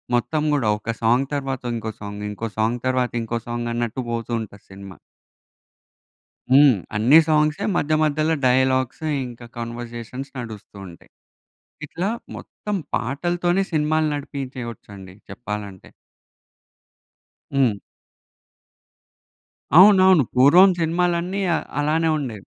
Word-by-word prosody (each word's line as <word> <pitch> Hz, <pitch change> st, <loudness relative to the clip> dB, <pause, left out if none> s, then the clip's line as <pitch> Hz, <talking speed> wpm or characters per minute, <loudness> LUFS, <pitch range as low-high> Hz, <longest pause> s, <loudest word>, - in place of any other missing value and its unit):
మొత్తం 150 Hz, +5 st, 0 dB
గూడా 120 Hz, -7 st, +1 dB
ఒక 115 Hz, +2 st, -4 dB
సాంగ్ 120 Hz, +4 st, +2 dB
తరువాత 135 Hz, -2 st, -3 dB
ఇంకో 110 Hz, -1 st, -4 dB
సాంగ్, 105 Hz, 0 st, -7 dB
ఇంకో 110 Hz, +2 st, -5 dB
సాంగ్ 115 Hz, +3 st, 0 dB
తరువాత 130 Hz, -1 st, 0 dB
ఇంకో 115 Hz, +1 st, -3 dB
సాంగ్ 120 Hz, 0 st, -3 dB
అన్నట్టు 120 Hz, +2 st, -2 dB
పోతూ 115 Hz, 0 st, -4 dB
ఉంటది 100 Hz, -2 st, -11 dB
సినిమా. 95 Hz, -1 st, -11 dB, 1.5 s
హ్మ్. 140 Hz, -2 st, +7 dB, 0.2 s
అన్ని 125 Hz, +10 st, +6 dB
సాంగ్సే 150 Hz, -1 st, +2 dB
మధ్య 155 Hz, +2 st, 0 dB
మధ్యల 155 Hz, +1 st, +1 dB, 0.2 s
డైలాగ్స్, 130 Hz, +3 st, +1 dB, 0.2 s
ఇంకా 120 Hz, 0 st, -11 dB
కన్వర్జేషన్స్ 120 Hz, +2 st, -7 dB
నడుస్తూ 110 Hz, -4 st, -9 dB
ఉంటాయి. 85 Hz, -, -16 dB, 0.7 s
ఇట్లా 175 Hz, +7 st, -3 dB, 0.3 s
మొత్తం 210 Hz, -1 st, -6 dB, 0.2 s
పాటలతోనే 175 Hz, +8 st, -1 dB
సినిమాలు 155 Hz, 0 st, +1 dB
నడిపించేయచ్చండి 120 Hz, -9 st, -8 dB, 0.2 s
చెప్పాలంటే. 105 Hz, -5 st, -7 dB, 1.6 s
హ్మ్. 120 Hz, -7 st, +2 dB, 2.0 s
అవునవును. 185 Hz, -5 st, +7 dB
పూర్వం 175 Hz, +9 st, +7 dB
సినిమాలన్నీ 175 Hz, +3 st, 0 dB
అ -, -, +1 dB, 0.2 s
అలానే 160 Hz, +2 st, +1 dB
ఉండేవి. 115 Hz, -9 st, -6 dB
130 Hz, 105 wpm, -22 LUFS, 115-155 Hz, 2.0 s, హ్మ్